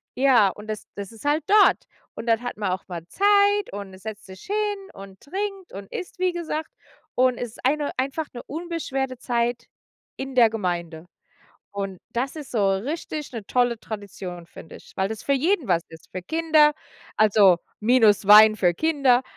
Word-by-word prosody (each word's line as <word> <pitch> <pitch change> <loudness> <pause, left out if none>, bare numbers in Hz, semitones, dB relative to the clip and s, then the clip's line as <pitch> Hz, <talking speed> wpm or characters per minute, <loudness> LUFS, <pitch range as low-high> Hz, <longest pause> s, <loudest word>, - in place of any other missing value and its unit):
ja, 250 -7 +5
und 210 +3 -10
das 215 -1 -5
das 200 0 -7
ist 225 - -14
halt 295 +1 +1
dort. 415 0 +5 0.3
Und 225 - -7
dann 225 0 +2
hat 245 - -5
man 200 -3 -1
auch 190 - -6
mal 170 -2 -6
Zeit 405 0 +3
und, 200 -1 -7
äh, - - -11
setzt 215 0 -8
sich 190 0 -12
hin 410 -1 -2
und 195 -1 -12
trinkt 390 +3 -5
und 195 0 -9
isst, 365 0 -7
wie 365 -1 +1
gesagt. 320 -2 -4 0.5
Und 255 -1 +3
ist 240 -1 -7
eine 295 +2 +1
einfach 275 +4 -2
'ne 240 - -7
unbeschwerte 285 -5 -4
Zeit 240 0 -1 0.5
in 265 -1 -6
der 235 -3 +6
Gemeinde. 175 -6 -4 0.7
Und 195 -2 -4
das 260 +6 -2
ist 295 -3 -8
so 200 -4 +2
richtig 295 - -4
'ne 220 -4 -7
tolle 245 -2 +1
Tradition, 195 -5 -7
finde 160 - -12
ich, - - -17
weil 190 +2 0
es 220 - -6
für 280 - 0
jeden 315 - +1
was 170 -2 +2
ist, 160 -1 -15
für 185 - -4
Kinder. 315 - +3 0.4
Also, 205 -4 +5 0.2
minus 215 -4 +4
Wein 215 +1 +9
für 175 -4 +2
Kinder, 275 - +2
240 Hz, 180 wpm, -24 LUFS, 200-305 Hz, 0.7 s, Wein